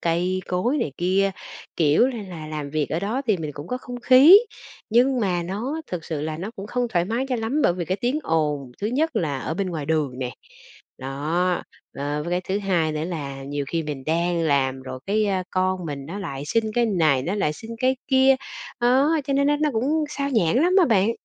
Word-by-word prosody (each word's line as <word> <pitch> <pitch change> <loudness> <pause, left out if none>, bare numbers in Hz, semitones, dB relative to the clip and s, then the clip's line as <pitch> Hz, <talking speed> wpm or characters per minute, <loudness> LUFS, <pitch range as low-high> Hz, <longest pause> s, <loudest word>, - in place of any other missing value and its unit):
cây 180 +3 0
cối 235 +11 0
này 155 - -2
kia, 190 +3 +2 0.5
kiểu 160 - +4
là, 240 -5 -4
là 170 -5 -8
làm 150 -2 -5
việc 155 -1 -1
ở 160 - -1
đó 230 +7 -2
thì 215 -5 +3
mình 155 -3 -5
cũng 145 +3 -8
có 250 - -3
không 245 -1 -8
khí. 270 +11 +9 0.5
Nhưng 250 +2 +3
mà 180 -4 0
nó 225 - -3
thực 175 -3 -5
sự 155 -3 -4
là 155 0 -3
nó 190 +6 -5
cũng 195 +1 -6
không 245 +1 -1
thoải 175 -5 +1
mái 230 +6 -2
cho 255 - 0
lắm 230 +7 -1
bởi 175 - +4
vì 175 -1 -3
cái 185 +3 -1
tiếng 250 +5 0
ồn, 150 - -1
thứ 205 - -1
nhất 270 +3 0
là 150 -8 0
ở 155 - -3
bên 195 +2 -1
ngoài 155 -4 -4
đường 150 -5 0
nè, 125 -1 -3 0.7
đó, 155 +7 -1 0.4
ờ, 145 +1 -2
với 170 - -5
cái 180 +1 +1
thứ 195 +2 0
hai 175 -6 0
nữa 155 +1 -2
là 140 -6 -5
nhiều 140 +1 -3
khi 165 -1 -1
mình 145 -3 -6
đang 170 +2 +1
làm 135 -4 +1
rồi 130 0 -7
cái, 215 +2 +2
ơ, 190 -2 0
con 185 -1 0
mình 140 -2 -5
nó 190 +5 -6
lại 140 -9 -5
xin 225 +7 +1
cái 240 -1 +3
này, 160 - +2
nó 180 +9 -2
lại 150 -7 0
xin 225 +9 -10
cái 260 0 +2
kia, 265 0 +5 0.4
đó, 265 +6 +4
cho 275 - -2
nên 280 +1 +2
nó 295 0 +3
nó 300 0 +1
cũng 285 +7 +1
xao 280 -1 -3
nhãng 225 - +2
lắm 360 - +3
á 370 - +6
bạn. 215 -2 +3
185 Hz, 230 wpm, -23 LUFS, 155-240 Hz, 0.7 s, khí